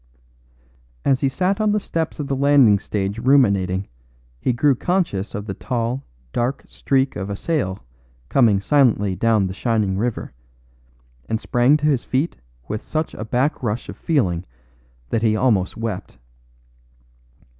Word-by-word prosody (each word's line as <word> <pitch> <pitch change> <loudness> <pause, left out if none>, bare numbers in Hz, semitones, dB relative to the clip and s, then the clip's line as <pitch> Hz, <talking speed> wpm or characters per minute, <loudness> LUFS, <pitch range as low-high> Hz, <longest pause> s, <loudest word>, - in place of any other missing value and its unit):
As 135 -1 +2
he 135 - +2
sat 185 +8 0
on 215 -1 +2
the 210 - +2
steps 165 -5 -3
of 145 - -3
the 135 - -1
landing 135 -7 +5
stage 100 +1 -3
ruminating 100 -8 +3 0.5
he 125 - +1
grew 140 +4 +3
conscious 130 - -1
of 105 -1 -4
the 100 - -4
tall, 120 +4 -2 0.3
dark 120 +3 -1
streak 135 -1 0
of 100 -1 -4
a 100 - -2
sail 100 - -2 0.4
coming 110 - +4
silently 110 -7 +3
down 110 -1 +2
the 95 - -3
shining 105 -3 0
river, 120 +1 -3 1.0
and 110 - 0
sprang 125 +5 +3
to 150 - -3
his 140 -5 +2
feet 140 +6 -1 0.3
with 105 - -3
such 155 0 -3
a - - -6
backrush 120 -1 -1
of - - -6
feeling 95 - 0 0.7
that 115 - +1
he 110 -2 +2
almost 105 -6 +1
wept. 110 -4 -5
120 Hz, 145 wpm, -21 LUFS, 100-140 Hz, 1.0 s, landing